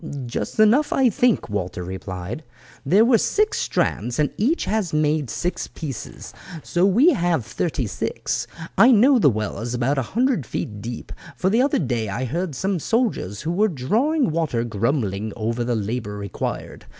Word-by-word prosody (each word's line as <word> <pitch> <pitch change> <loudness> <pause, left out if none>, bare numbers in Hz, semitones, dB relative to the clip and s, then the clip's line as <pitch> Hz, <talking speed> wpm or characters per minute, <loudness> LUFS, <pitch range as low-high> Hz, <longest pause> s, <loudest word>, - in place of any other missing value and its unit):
"Just 120 - -4
enough, 230 +8 +5
I 260 -3 +3
think," 245 +3 +2
Walter 95 -4 -3
replied; 95 - -6 0.4
"there 195 +11 +5
were 235 -2 +5
six 425 +1 +1
strands, 120 0 -1
and 150 -1 +1
each 275 +11 +1
has 210 -7 -1
made 150 -3 +1
six 180 +9 -2
pieces, 145 -7 -7 0.3
so 175 +2 +2
we 245 - +5
have 175 - 0
thirty 130 +3 -2
six. 115 +2 -3 0.3
I 245 - +8
know 255 +3 +6
the 145 - +5
well 110 -3 -3
is 120 +2 -3
about 130 +3 +1
a 130 - -5
hundred 250 - +2
feet 105 -2 -5
deep, 115 +2 -7 0.3
for 190 +1 +1
the 230 +4 +4
other 275 +2 +2
day 120 - -1
I 120 +7 -2
heard 165 +4 -3
some 190 +8 -1
of 190 - 0
the 155 - -7
soldiers 220 - 0
who 160 - -2
were 205 +5 +3
drawing 220 - +1
water 155 -8 0
grumbling 110 -2 -1
over 115 +2 -1
the 120 0 0
labour 105 -1 -3
required. 100 -1 -5
145 Hz, 175 wpm, -22 LUFS, -, 0.4 s, I